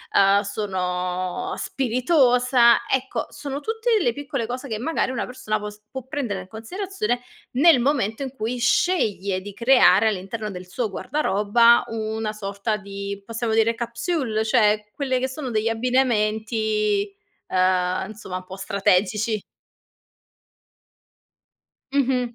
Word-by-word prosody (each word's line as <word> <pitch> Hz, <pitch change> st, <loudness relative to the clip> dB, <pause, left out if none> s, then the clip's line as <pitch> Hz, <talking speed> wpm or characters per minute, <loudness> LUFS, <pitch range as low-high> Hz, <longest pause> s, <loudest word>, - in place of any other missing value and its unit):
uhm, 200 Hz, +1 st, +5 dB
sono 185 Hz, -1 st, -3 dB
spiritosa. 250 Hz, -2 st, +3 dB
Ecco, 265 Hz, 0 st, -1 dB
sono 280 Hz, -1 st, -5 dB
tutte 445 Hz, +8 st, -2 dB
delle 285 Hz, -, +1 dB
piccole 275 Hz, -3 st, -4 dB
cose 255 Hz, +3 st, -5 dB
che, 220 Hz, -4 st, -3 dB
magari, 285 Hz, +1 st, -1 dB
una 255 Hz, -, -2 dB
persona 250 Hz, -4 st, -3 dB
può 210 Hz, 0 st, -5 dB
s 210 Hz, 0 st, -15 dB
può 265 Hz, -1 st, -6 dB
prendere 250 Hz, -10 st, -3 dB
in 180 Hz, -, -12 dB
considerazione 245 Hz, -, -3 dB, 0.3 s
nel 285 Hz, +2 st, +6 dB
momento 240 Hz, -3 st, 0 dB
in 265 Hz, -, -5 dB
cui 235 Hz, 0 st, -3 dB
sceglie 220 Hz, -, +1 dB
di 205 Hz, +1 st, -9 dB
creare 230 Hz, -3 st, +5 dB
all'interno 210 Hz, +2 st, -4 dB
del 180 Hz, -1 st, -8 dB
suo 225 Hz, +4 st, -2 dB
guardaroba 230 Hz, 0 st, +3 dB
una 220 Hz, -1 st, -3 dB
sorta 200 Hz, +1 st, -3 dB
di, 200 Hz, 0 st, -6 dB
possiamo 230 Hz, 0 st, -2 dB
dire, 225 Hz, +1 st, +3 dB
capsule. 235 Hz, 0 st, -2 dB
Cioè 210 Hz, -2 st, +2 dB
quelle 260 Hz, -3 st, 0 dB
che 260 Hz, -, 0 dB
sono 260 Hz, -1 st, -5 dB
degli 220 Hz, 0 st, +1 dB
abbinamenti, 220 Hz, -4 st, 0 dB, 0.3 s
uhm, 185 Hz, 0 st, +1 dB
insomma, 210 Hz, -4 st, -6 dB
un 185 Hz, -, -9 dB
po' 185 Hz, +1 st, -9 dB
strategici. 200 Hz, +3 st, +1 dB, 2.5 s
Mh-mh. 250 Hz, -3 st, +1 dB
225 Hz, 130 wpm, -23 LUFS, 200-255 Hz, 2.5 s, nel